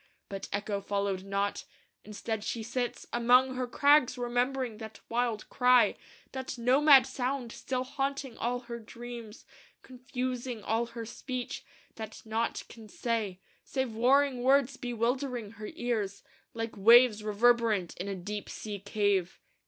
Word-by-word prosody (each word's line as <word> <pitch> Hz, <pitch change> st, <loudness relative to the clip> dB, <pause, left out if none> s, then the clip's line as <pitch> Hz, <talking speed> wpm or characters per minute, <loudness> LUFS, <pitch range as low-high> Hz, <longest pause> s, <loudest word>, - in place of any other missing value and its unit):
But 195 Hz, -1 st, -6 dB
Echo 200 Hz, 0 st, -2 dB
followed 200 Hz, -1 st, -1 dB
not; 200 Hz, +1 st, -1 dB, 0.4 s
instead, 215 Hz, +1 st, -4 dB
she 225 Hz, 0 st, -3 dB
sits 240 Hz, +2 st, -3 dB
Among 250 Hz, +2 st, +4 dB
her 255 Hz, -1 st, -2 dB
crags 280 Hz, -1 st, +4 dB
remembering 245 Hz, -1 st, -1 dB
that 220 Hz, -1 st, -9 dB
wild 235 Hz, -2 st, -1 dB
cry, 250 Hz, -1 st, +5 dB, 0.4 s
That 260 Hz, -1 st, -5 dB
nomad 265 Hz, +2 st, +6 dB
sound 260 Hz, -2 st, -3 dB
still 255 Hz, +1 st, -3 dB
haunting 275 Hz, -1 st, -3 dB
all 245 Hz, +1 st, -2 dB
her 235 Hz, -1 st, -7 dB
dreams, 235 Hz, -1 st, -9 dB, 0.4 s
Confusing 250 Hz, -2 st, -4 dB
all 225 Hz, +3 st, 0 dB
her 230 Hz, -1 st, -7 dB
speech, 250 Hz, +2 st, -5 dB, 0.3 s
that 220 Hz, -1 st, -8 dB
naught 225 Hz, +1 st, -1 dB
can 225 Hz, -2 st, -13 dB
say 210 Hz, -5 st, -2 dB, 0.2 s
Save 265 Hz, -4 st, -2 dB
warring 260 Hz, +3 st, +3 dB
words 270 Hz, +1 st, +3 dB
bewildering 245 Hz, -1 st, -2 dB
her 215 Hz, 0 st, -6 dB
ears 215 Hz, -5 st, -2 dB, 0.3 s
Like 225 Hz, 0 st, -4 dB
waves 225 Hz, +1 st, +6 dB
reverberant 215 Hz, -3 st, +2 dB
in 185 Hz, -, -4 dB
a 200 Hz, -, -3 dB
deep 205 Hz, +3 st, -5 dB
sea 210 Hz, -2 st, -6 dB
cave. 200 Hz, -2 st, 0 dB
235 Hz, 135 wpm, -30 LUFS, 215-255 Hz, 0.4 s, nomad